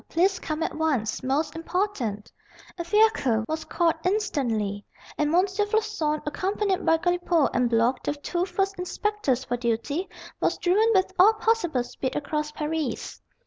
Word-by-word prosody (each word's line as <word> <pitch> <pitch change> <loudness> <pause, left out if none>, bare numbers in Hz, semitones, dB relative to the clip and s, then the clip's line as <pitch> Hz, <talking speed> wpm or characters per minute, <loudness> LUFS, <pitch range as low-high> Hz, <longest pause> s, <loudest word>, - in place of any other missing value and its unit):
Please 370 +3 +2
come 310 +1 -3
at - - -2
once. 285 -9 -1
Most 295 +4 -1
important." 325 - -2 0.5
A - - -1
fiacre 340 - +3
was 315 0 -3
called 335 -2 +2
instantly, 245 - -1 0.3
and 300 0 0
M. 360 +3 +4
Floçon, 410 -6 -1
accompanied 385 +5 -1
by 325 - +4
Galipaud 350 -2 +1
and 250 -1 +2
Block, 235 +2 +2
the 290 - -2
two 345 +5 -2
first 390 +1 -1
inspectors 360 - -1
for 245 -1 -2
duty, 245 +9 -2 0.3
was - - +1
driven 410 +6 +3
with 380 0 +2
all 415 +4 +8
possible 430 - +1
speed 260 +1 -5
across 300 +1 -2
Paris. 305 -1 -3
325 Hz, 145 wpm, -26 LUFS, 265-385 Hz, 0.5 s, all